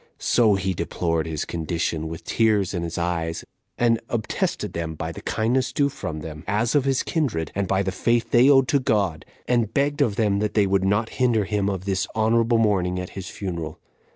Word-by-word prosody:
So 110 -4 +3
he 95 0 -1
deplored 85 -1 -1
his 80 -2 -3
condition, 80 -1 -2
with 80 0 -7
tears 105 -4 +1
in 90 - -2
his 85 -1 -4
eyes, 85 -1 -2 0.3
and 115 -1 +3
obtested 115 -3 -2
them 80 -1 -4
by - - -4
the - - -9
kindness 130 +4 0
due 140 +2 +2
from 80 - -6
them, 75 0 -8
as 110 +4 +1
of 145 -3 +3
his 135 -1 +1
kindred, 115 - -1
and 100 -1 -1
by 95 +1 +1
the 95 - -1
faith 115 +5 0
they 125 +3 +6
owed 135 -2 +5
to 140 - +3
God, 100 - 0 0.2
and 120 -4 +1
begged 145 +1 0
of 105 - +2
them 100 -3 +1
that 105 0 -2
they 105 -2 +4
would 95 0 +1
not 100 +3 +1
hinder 115 -5 +3
him 100 0 0
of 95 -1 -4
this 95 -2 0
honorable 115 +1 +3
mourning 95 -5 +1
at 90 - -6
his 95 -1 -7
funeral. 85 -5 -5
100 Hz, 205 wpm, -24 LUFS, 85-115 Hz, 0.3 s, they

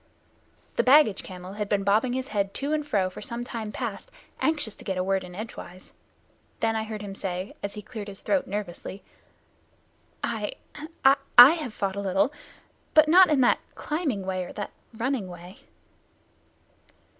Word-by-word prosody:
The - - +4
baggage 260 -6 +5
camel 185 0 -9
had 210 0 -4
been 200 -1 +1
bobbing 215 +5 +2
his 260 +1 -3
head 200 -2 -1
to 285 +2 -1
and 300 -1 -1
fro 195 -8 +1
for 185 - -9
some 235 0 -4
time 225 -3 -5
past, 210 -3 -5 0.3
anxious 300 -9 0
to - - -11
get 190 -1 -3
a 185 - +1
word 190 0 0
in 180 -1 -10
edgewise. 185 -3 -9 0.7
Then 225 0 +1
I 220 0 -1
heard 215 -1 -6
him 200 -1 -6
say, 185 -1 -4
as 200 - -5
he 210 - -7
cleared 215 -1 -7
his 195 -1 -9
throat, 290 - 0
nervously: 195 -1 -5 1.2
"I - - -2 0.5
I 270 +1 +7 0.2
I 245 +4 +12
have 305 -9 -4
fought 195 -1 -2
a - - -3
little, 195 +8 +1 0.6
but 310 0 +7
not 360 +3 +7
in 295 -3 +3
that 245 - +4 0.2
climbing 295 - -2
way 185 -1 -2
or - - -9
that 205 - -5 0.2
running 240 -2 -2
way." 175 +2 -11
210 Hz, 175 wpm, -26 LUFS, 195-255 Hz, 1.2 s, I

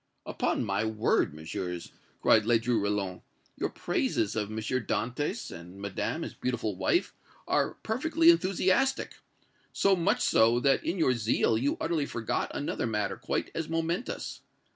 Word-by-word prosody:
"Upon - - -1
my 100 +1 0
word, 110 -1 +1
Messieurs," 85 +3 -5 0.3
cried 110 - +6
Ledru 115 0 +2
Rollin, 100 -3 -2 0.3
"your - - -2
praises - - -1
of 105 -2 -1
M. 110 - -5
Dantès 125 - -2
and 90 +3 -10
Madame, 100 -1 -3
his - - -6
beautiful 115 -5 -2
wife, 95 0 +1 0.3
are - - +1
perfectly 320 +8 +4
enthusiastic 195 - +1 0.5
so 195 -1 +3
much 170 -2 +1
so, 115 +2 +4
that, 135 +1 +2
in 175 - -1
your 155 -7 +3
zeal, 115 -1 +2
you 130 +6 0
utterly 160 -4 0
forgot 115 -2 -2
another 140 - -2
matter 105 -3 -1
quite - - -3
as 165 -1 -3
momentous. 165 +7 -2
120 Hz, 140 wpm, -29 LUFS, 105-165 Hz, 0.5 s, cried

